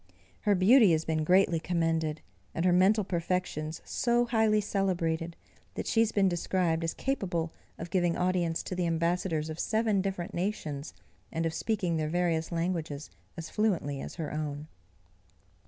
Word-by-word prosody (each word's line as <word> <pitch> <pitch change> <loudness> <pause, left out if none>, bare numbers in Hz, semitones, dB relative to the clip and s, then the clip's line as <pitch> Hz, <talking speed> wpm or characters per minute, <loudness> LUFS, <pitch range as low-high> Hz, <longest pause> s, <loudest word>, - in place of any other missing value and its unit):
Her 205 - +5
beauty 205 +1 +6
has 160 0 0
been 155 -1 0
greatly 180 0 +4
commended, 165 -2 -1 0.3
and 165 - 0
her 180 - +4
mental 195 +4 +4
perfections 170 -3 -2
so 240 0 +1
highly 220 -2 +3
celebrated, 170 -5 -1 0.4
that - - -3
she 225 - +1
has 225 -1 +3
been 200 -3 +3
described 175 -1 0
as 165 - -2
capable 180 -11 -2 0.2
of 170 +1 -7
giving 175 -2 +1
audience 180 -2 0
to - - -5
the 180 -1 0
ambassadors 170 -1 0
of 160 +1 -6
seven 220 -3 +1
different 190 0 -3
nations, 160 -6 -3 0.4
and 165 0 -1
of 165 - -1
speaking 185 -6 -1
their 155 -1 -1
various 170 -1 0
languages 165 -4 -3 0.3
as 165 -1 -7
fluently 170 -10 0
as - - -7
her 160 -4 -4
own. 150 -1 -4
175 Hz, 155 wpm, -29 LUFS, 160-195 Hz, 0.4 s, beauty